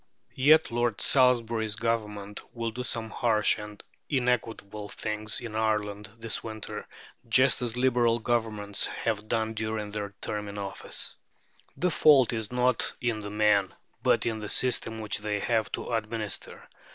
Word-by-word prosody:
Yet 150 +2 +5
Lord 120 -3 0
Salisbury's 115 -5 +3
Government 105 -3 -2
will 115 -1 -2
do 125 +3 -5
some 115 -3 -2
harsh 110 -3 +2
and 105 -1 -9 0.3
inequitable 115 -5 -1
things 110 0 -3
in 110 -2 -7
Ireland 105 -1 -1
this 115 -1 -3
winter, 110 -1 -6 0.4
just 130 +3 +4
as 120 -1 -1
Liberal 120 -2 +3
Governments 110 -4 0
have 110 -2 -3
done 110 -1 0
during 110 -1 -3
their 100 -1 -5
term 105 -1 -4
of 100 0 -7
office. 100 -1 -3 0.6
The 180 0 +1
fault 140 -6 +5
is 110 -1 -3
not 125 0 +1
in 120 -3 -1
the 105 -1 -4
men, 105 -2 +2 0.3
but - - +3
in 110 -2 -1
the 105 -1 -6
system 115 -3 +2
which 110 - -1
they 105 0 -2
have 110 0 0
to - - -4
administer. 110 -2 -3
110 Hz, 150 wpm, -28 LUFS, 105-120 Hz, 0.6 s, Yet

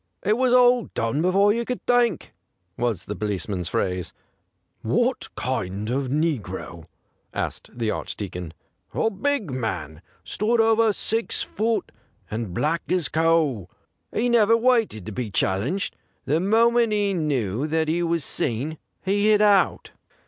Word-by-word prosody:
' - - -37
It 210 +2 +3
was 255 +1 +2
all 245 -1 +5
done 115 +6 0
before 195 +4 +4
you 235 +1 -1
could 250 +1 -5
think/ 240 -7 +1 0.4
was 115 -6 -2
the 105 - -5
police 105 -3 -3
man's 90 -5 -3
phrase. 90 -2 -2 0.4
' - - -49 0.2
What - - -1
kind 100 +5 -3
of 135 +1 -1
negro 115 - -2 0.2
?' - - -45
asked - - -4
the 115 -3 -2
Archdeacon. 90 -7 -5 0.4
'A 225 - +1
big 230 - -1
man 90 - -4
— 85 - -35
stood 215 - 0
over 225 0 +4
six 225 +3 -1
foot, 225 +1 -1 0.4
and 110 -3 -3
black 155 - 0
as 180 -4 +2
coal. 155 - +1 0.4
He 235 - 0
never 230 -2 +4
waited 230 - +1
to 110 - -6
be 115 +1 -4
challenged; 105 - -1 0.3
the 150 +4 +1
moment 230 +4 +3
he 205 -1 +1
knew 140 - -1
that 160 0 0
he 165 +3 +1
was 170 -2 0
seen 140 +8 -1 0.3
he 205 +2 +2
hit 210 -1 +5
out.' 205 -2 +3
160 Hz, 155 wpm, -24 LUFS, -, 0.4 s, all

